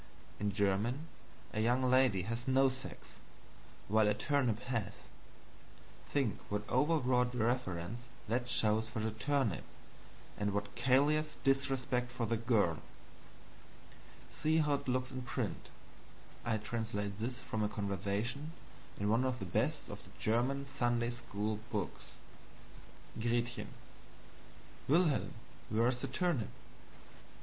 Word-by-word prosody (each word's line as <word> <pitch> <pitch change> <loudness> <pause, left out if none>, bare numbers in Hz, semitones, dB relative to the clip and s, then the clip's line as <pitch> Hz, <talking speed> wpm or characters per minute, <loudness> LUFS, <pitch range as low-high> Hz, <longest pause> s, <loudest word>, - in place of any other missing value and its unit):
In 105 -1 0
German, 100 - +1 0.5
a 105 - -1
young 120 +3 +3
lady 130 -7 +4
has 115 +5 -3
no 135 +1 +5
sex, 130 +1 -8 0.7
while 110 +1 +4
a 105 - +3
turnip 120 -1 +1
has. 115 -6 -3 1.0
Think 135 -7 0
what 105 +1 -2
overwrought 125 -3 +2
reverence 115 -2 -1 0.2
that 120 +3 0
shows 110 -1 +3
for 115 +1 -7
the 110 +1 0
turnip, 130 -1 0 0.8
and 105 -1 0
what 100 0 -2
callous 145 +5 +3
disrespect 130 -2 +1
for 125 -1 -2
the 115 - +1
girl. 110 -8 +2 1.5
See 155 +1 +2
how 150 -2 +3
it 140 - -2
looks 130 0 0
in 130 0 -4
print 120 -1 -3 0.7
I 115 -2 +1
translate 105 -2 -3
this 125 +3 -2
from 110 -4 -3
a 105 - +1
conversation 105 - -2 0.5
in 100 - 0
one 115 +4 +3
of 130 -1 0
the 95 - -5
best 90 - 0
of - - -8
the - - -15
German 125 +5 +1
Sunday 120 -3 0
school 105 -2 -3
books: 100 -5 -4 1.1
"Gretchen. 120 +1 0 1.2
Wilhelm, 155 -1 +3 0.3
where 115 +2 +3
is 125 -1 -1
the - - -1
turnip? 140 - 0
120 Hz, 125 wpm, -35 LUFS, 105-130 Hz, 1.5 s, no